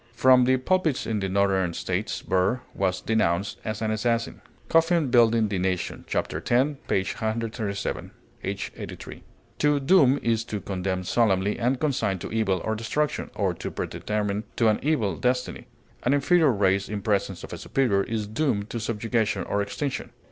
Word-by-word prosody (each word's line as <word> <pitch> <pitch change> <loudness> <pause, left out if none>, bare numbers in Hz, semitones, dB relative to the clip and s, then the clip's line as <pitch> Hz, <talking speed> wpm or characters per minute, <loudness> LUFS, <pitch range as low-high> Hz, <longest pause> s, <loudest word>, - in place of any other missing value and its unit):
From 130 -1 +6
the 130 +1 +4
pulpits 160 0 +1
in 110 -2 -1
the 95 -1 -2
northern 95 -3 +1
States 95 +1 -3
Burr 95 +7 +1
was 95 -1 -1
denounced 100 -4 0
as 110 0 -3
an 110 - 0
assassin. 115 +1 -1 0.3
COFFIN 165 -4 +3
Building 115 -2 +5
the 100 -2 -2
Nation 90 -1 -2
ch. - - -4
10, 135 +4 0
p. 95 - +2
137. 110 0 -3 0.3
[H. 100 +1 -3
'83.] - - -8 0.4
To 150 -1 +3
doom 140 -2 +5
is 115 -1 +1
to 105 - -4
condemn 95 -1 -3
solemnly 100 0 +1
and 125 +2 +1
consign 125 -10 0
to - - -7
evil 105 -5 +1
or 110 - 0
destruction 130 +7 -1
or - - 0
to - - -5
predetermine 105 0 -3
to 115 - +3
an 105 - +1
evil 115 - 0
destiny; 125 0 -1 0.3
an 130 +3 +2
inferior 155 +1 +4
race 100 -2 +1
in 105 -2 -4
presence 100 -3 0
of - - -8
a - - -5
superior 120 -8 +1
is 110 +1 -2
doomed 110 -2 -1
to 120 - -3
subjugation 110 -2 -1
or 100 - -1
extinction. 130 +7 -3
110 Hz, 165 wpm, -25 LUFS, 100-125 Hz, 0.4 s, From